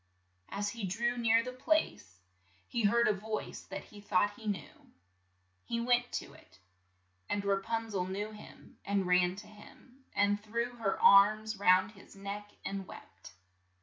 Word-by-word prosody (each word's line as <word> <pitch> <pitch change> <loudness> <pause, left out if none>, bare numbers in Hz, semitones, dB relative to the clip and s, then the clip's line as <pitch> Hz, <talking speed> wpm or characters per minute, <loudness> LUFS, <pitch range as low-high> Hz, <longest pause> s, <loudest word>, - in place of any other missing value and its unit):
As 205 +1 -2
he 230 -1 -7
drew 230 +6 0
near 230 -1 +3
the 255 +1 -6
place, 255 - -1 0.5
he 235 -3 -1
heard 235 +3 +4
a 215 - +4
voice 215 +2 -5
that - - -7
he 205 - -14
thought 205 0 +2
he 220 +1 -11
knew. 205 -3 -5 0.7
He 235 - -2
went 245 +1 +2
to - - -4
it, 95 - -19 0.7
and 200 -1 -1
Ra 200 0 +2
pun 225 +1 -3
zel 185 -3 -1
knew 205 +3 -4
him, 210 - -14
and 200 -1 0
ran 180 0 +3
to 205 +2 -10
him, 250 +5 -17
and 205 0 +2
threw 235 +3 -2
her 200 -4 -1
arms 215 +1 +6
round 185 0 +4
his 200 -2 -16
neck 200 +1 -6 0.2
and 195 -1 -4
wept. - - -13
205 Hz, 165 wpm, -32 LUFS, 195-230 Hz, 0.7 s, arms